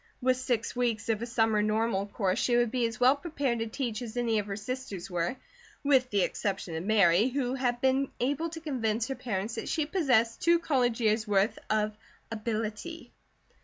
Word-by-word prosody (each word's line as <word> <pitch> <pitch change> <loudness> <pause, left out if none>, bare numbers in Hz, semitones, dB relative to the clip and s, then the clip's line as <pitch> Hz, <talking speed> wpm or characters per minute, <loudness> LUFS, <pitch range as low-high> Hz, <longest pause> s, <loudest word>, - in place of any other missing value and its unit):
With 255 0 +2
six 245 -3 -1
weeks 230 -3 -1
of 220 -1 +1
a 235 - -3
summer 225 -2 +2
Normal 215 -1 0
course 195 -2 -1
she 240 -1 +2
would 240 -2 +2
be 245 -2 +1
as 225 - -7
well 255 +2 +6
prepared 280 -6 -2
to 225 - -2
teach 230 -1 -3
as 235 -1 -6
any 230 -3 +1
of 205 - -4
her 200 - -3
sisters 210 -4 -5
were, 175 +6 -1 0.5
with 265 -3 +3
the 200 -4 +2
exception 190 -4 -2
of 160 - -3
Mary, 200 0 +4
who 260 -1 -1
had 245 -2 0
been 265 +1 +2
able 290 +7 0
to 325 0 -7
convince 230 -7 -1
her 270 - -2
parents 215 -3 -3
that - - -6
she 315 -2 0
possessed 255 - +2
two 340 +1 +5
college 250 -8 +1
years' 215 0 +2
worth 205 +1 +2
of 215 0 +1 0.4
"ability." 225 +7 -4
230 Hz, 195 wpm, -29 LUFS, 215-260 Hz, 0.5 s, well